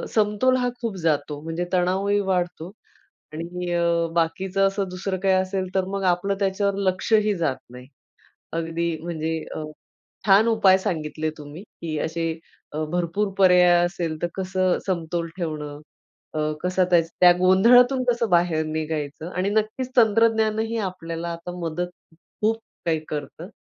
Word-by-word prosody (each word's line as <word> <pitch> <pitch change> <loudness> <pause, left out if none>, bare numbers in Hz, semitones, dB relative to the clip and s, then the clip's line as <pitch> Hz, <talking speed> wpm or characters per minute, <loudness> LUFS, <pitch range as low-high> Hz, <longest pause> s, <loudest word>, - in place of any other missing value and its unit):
समतोल 215 +4 +3
हा 245 - +1
खूप 225 -4 -3
जातो. 150 -2 0
म्हणजे 165 +2 -3
तणावही 190 +3 +2
वाढतो 180 -1 -1 0.6
आणि 175 +2 -5
अ, 170 -1 +2
बाकीचं 185 +4 +1
असं 195 0 -1
दुसरं 185 +1 -3
काही 190 -1 +3
असेल 185 0 0
तर 190 -1 +2
मग 195 - -2
आपलं 195 +3 -2
त्याच्यावर 200 0 +1
लक्षही 210 +3 +2
जात 150 -6 0
नाही. 125 +1 -11 0.7
अगदी 165 0 -2
म्हणजे 160 -1 -2 0.2
अ, 155 - -4 0.6
छान 205 +3 +6
उपाय 205 -4 +5
सांगितले 155 -4 -3
तुम्ही, 150 +5 -10
की 165 -7 -6
असे 165 0 -2 0.6
भरपूर 180 +4 0
पर्याय 180 -2 +6
असेल 170 -3 -3
तर 175 - +1
कसं 185 -1 0
समतोल 170 -2 -2
ठेवणं. 150 -4 -4 0.6
अ, - - -1 0.2
कसा 185 +1 +1
त्या 175 - +7 0.2
त्या 180 0 +9
गोंधळातून 245 +8 +5
कसं 235 -2 +1
बाहेर 170 -3 +2
निघायचं 155 0 -4
आणि 185 +2 -1
नक्कीच 220 +4 -1
तंत्रज्ञानानंही 220 0 +3
आपल्याला 170 -2 -5
आता 170 +1 -7
मदत 170 +1 -3 0.5
खूप 220 +1 +3 0.3
काही 160 -1 +1
करतं. 150 +4 -6
180 Hz, 135 wpm, -24 LUFS, 165-200 Hz, 0.7 s, त्या